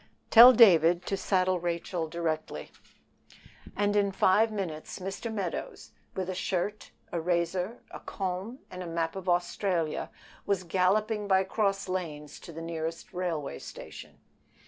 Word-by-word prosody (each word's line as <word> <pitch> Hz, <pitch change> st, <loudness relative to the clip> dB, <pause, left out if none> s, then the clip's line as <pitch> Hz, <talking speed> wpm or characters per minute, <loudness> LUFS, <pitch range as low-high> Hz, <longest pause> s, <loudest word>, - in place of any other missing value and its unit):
"Tell 240 Hz, +2 st, +11 dB
David 175 Hz, -7 st, +6 dB
to 195 Hz, -, -1 dB
saddle 185 Hz, -1 st, +1 dB
Rachel 170 Hz, 0 st, -2 dB
directly." 155 Hz, -, -3 dB, 1.0 s
And 205 Hz, 0 st, +1 dB
in 200 Hz, -1 st, +2 dB
five 210 Hz, +4 st, +3 dB
minutes 175 Hz, -7 st, -5 dB
Mr. 195 Hz, +5 st, -5 dB
Meadows, 195 Hz, -6 st, -5 dB, 0.2 s
with 185 Hz, -1 st, -2 dB
a 185 Hz, -, -2 dB
shirt, 190 Hz, +3 st, -2 dB, 0.2 s
a 170 Hz, -, -2 dB
razor, 180 Hz, +5 st, -1 dB
a -, -, -8 dB
comb, 190 Hz, +5 st, -4 dB
and 180 Hz, 0 st, -7 dB
a 180 Hz, -, -6 dB
map 165 Hz, 0 st, -2 dB
of 190 Hz, -1 st, -4 dB
Australia, 175 Hz, -2 st, 0 dB, 0.3 s
was 200 Hz, -2 st, 0 dB
galloping 205 Hz, +4 st, +1 dB
by 190 Hz, -1 st, +4 dB
cross 195 Hz, 0 st, -1 dB
lanes 155 Hz, -6 st, -5 dB
to -, -, -11 dB
the 165 Hz, +1 st, -7 dB
nearest 165 Hz, +3 st, -5 dB
railway 170 Hz, -5 st, -3 dB
station. -, -, -10 dB
185 Hz, 140 wpm, -29 LUFS, 170-195 Hz, 1.0 s, Tell